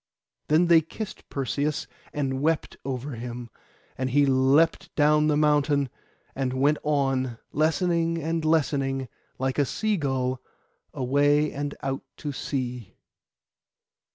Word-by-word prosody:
Then 155 +4 +4
they 170 -1 +6
kissed 205 +7 -8
Perseus, 140 +2 -1 0.3
and 135 -2 -2
wept 160 +1 0
over 135 +1 -4
him, 120 0 -6 0.4
and 130 0 -2
he 145 +2 +4
leapt 140 +7 +3
down 150 0 +4
the 150 -1 +2
mountain, 145 -2 +2 0.4
and 130 -2 -2
went 140 +3 +2
on, 135 -5 0
lessening 165 +2 +1
and 165 +1 -1
lessening 135 -4 +1 0.3
like 130 +2 -1
a - - +5
sea 215 +7 0
gull, 130 -4 -1 0.5
away 145 +3 +2
and 145 0 -4
out 135 0 -2 0.2
to 145 - -4
sea. 125 -5 -4
145 Hz, 125 wpm, -26 LUFS, 130-155 Hz, 0.5 s, they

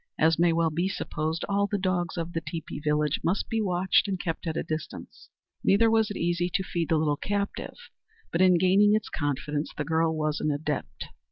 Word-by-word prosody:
As 160 0 +3
may 170 0 +4
well 165 -1 +1
be 175 +5 0
supposed, 160 -3 -3
all 200 0 +1
the 205 - -1
dogs 185 -3 -1
of 170 +1 -4
the 165 - -2
teepee 160 -1 -6
village 150 0 0
must 185 +4 0
be 225 -1 0
watched 185 0 +2
and 190 -2 -2
kept 165 0 -4
at 160 - -2
a - - -1
distance. 155 0 -7 0.3
Neither 225 +3 +4
was 220 -1 +3
it 205 - -5
easy 175 +1 0
to 190 - +1
feed 170 -3 -3
the 160 - +3
little 150 -2 +1
captive; 200 +3 -3 0.6
but 170 - +1
in 185 -1 +6
gaining 195 +4 +4
its 215 -1 -2
confidence 145 0 -2
the 150 - -2
girl 160 +1 +1
was 155 -1 -1
an 155 - 0
adept. 150 0 -3
170 Hz, 205 wpm, -27 LUFS, 155-190 Hz, 0.6 s, in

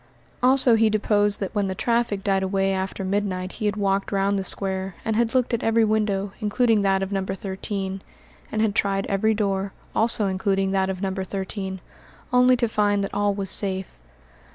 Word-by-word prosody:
Also 255 -1 +4
he 225 -1 +4
deposed 205 -1 +2
that 195 - -4
when 205 -2 0
the 190 - -3
traffic 235 -3 0
died 195 -1 +1
away 195 0 0
after 190 +1 -3
midnight 185 -2 -1
he 215 - -3
had 205 - 0
walked 195 -1 0
round 200 0 +1
the - - -2
square, 190 -1 -3
and 220 - 0
had 235 +1 +1
looked 250 -1 +1
at 235 - 0
every 225 0 +3
window, 205 -2 0
including 220 0 +2
that 195 -1 +2
of 195 - -4
No. 195 -1 0
13, 190 0 -4 0.5
and 215 - 0
had 215 -2 +1
tried 195 -1 0
every 220 +2 +1
door, 195 -2 -1 0.2
also 225 -2 +2
including 195 0 0
that 190 -1 +1
of 190 0 -4
No. 190 -1 -1
13, 190 0 -4 0.5
only 250 0 +5
to 235 - +1
find 205 -2 +1
that 195 - -4
all 205 0 +1
was 195 -1 0
safe. 190 - -1
200 Hz, 190 wpm, -24 LUFS, 195-215 Hz, 0.5 s, only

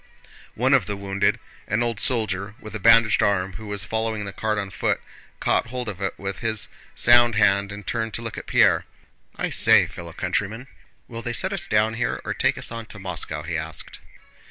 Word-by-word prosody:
One 130 +4 +2
of 125 -9 +4
the 100 - -3
wounded, 100 0 0 0.3
an 105 +4 +1
old 115 -3 -2
soldier 105 -4 0
with 110 -4 -10
a 110 - -4
bandaged 115 -1 +5
arm 95 -2 +1
who 110 +3 -9
was 100 -1 -3
following 110 +1 -2
the 100 - -6
cart 110 +1 -1
on 100 -2 -3
foot, 95 - 0 0.4
caught - - +1
hold 125 0 -4
of 100 -3 -5
it 95 - -2
with 95 0 -5
his 110 -2 -2 0.3
sound 120 -1 +5
hand 100 -1 +3
and 105 -1 -8
turned 115 -2 -2
to 115 - -3
look 115 -2 -5
at - - -8
Pierre. - - +4 0.5
"I - - -2
say, - - +6
fellow 85 -1 -9
countryman! 105 +7 -2 0.4
Will 115 0 -7
they 120 0 -4
set 190 +9 -1
us 175 -3 -2
down 110 +1 +2
here 115 +1 -1
or - - -2
take - - +1
us - - 0
on 115 -1 -6
to 110 - -10
Moscow?" 80 -5 -4
he 85 +2 -4
asked. 80 -2 -5
105 Hz, 205 wpm, -24 LUFS, 95-115 Hz, 0.5 s, say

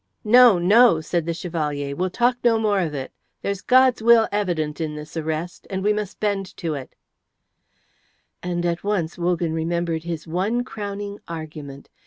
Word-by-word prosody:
"No, 240 -2 +7
no," 200 +1 +5
said 165 +1 -2
the 170 - 0
Chevalier. 150 -5 -3
"We'll 185 +3 -1
talk 245 +6 +1
no 235 -2 +4
more 210 -3 +1
of 160 -5 -2
it. 130 -1 -5 0.3
There's 200 -1 -2
God's 255 -2 +4
will 230 0 +6
evident 170 -7 -1
in 155 -1 -3
this 150 +2 -9
arrest, 160 +2 -4
and 190 -1 -3
we 210 +1 +3
must 210 -2 -5
bend 195 -2 -2
to 165 -4 -3
it;" 135 -3 -8 1.5
and 175 -1 -2
at 170 0 -1
once 195 -5 -1
Wogan 175 -2 0
remembered 165 0 -1
his 165 -2 -5
one 195 +9 -1
crowning 205 -2 -6
argument. 155 -4 -8
175 Hz, 165 wpm, -22 LUFS, 160-205 Hz, 1.5 s, No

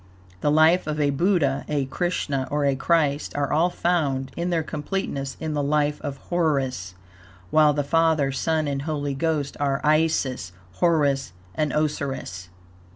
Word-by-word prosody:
The 145 - +1
life 160 +3 +4
of 155 0 -2
a 145 -1 +2
Buddha, 145 -3 +1
a 145 -2 0
Krishna 140 -3 -2
or 145 0 0
a 140 -1 +2
Christ, 150 0 +1
are 145 0 0
all 165 +4 +3
found 145 -8 0
in 170 +1 -2
their 165 -2 +1
completeness 150 -3 -4
in 160 -1 -3
the 145 - 0
life 145 +1 0
of 140 -2 -5
Horus; 135 - 0 0.6
while 155 -1 +5
the 145 0 0
Father, 160 -2 +2
Son 155 +3 0
and 140 -1 -2
Holy 145 -2 -2
Ghost 150 0 -1
are 140 -1 +1
Isis, 150 - +1 0.2
Horus 145 - +2 0.2
and 150 -2 0
Osirus. 135 - -2
145 Hz, 155 wpm, -24 LUFS, 140-160 Hz, 0.6 s, while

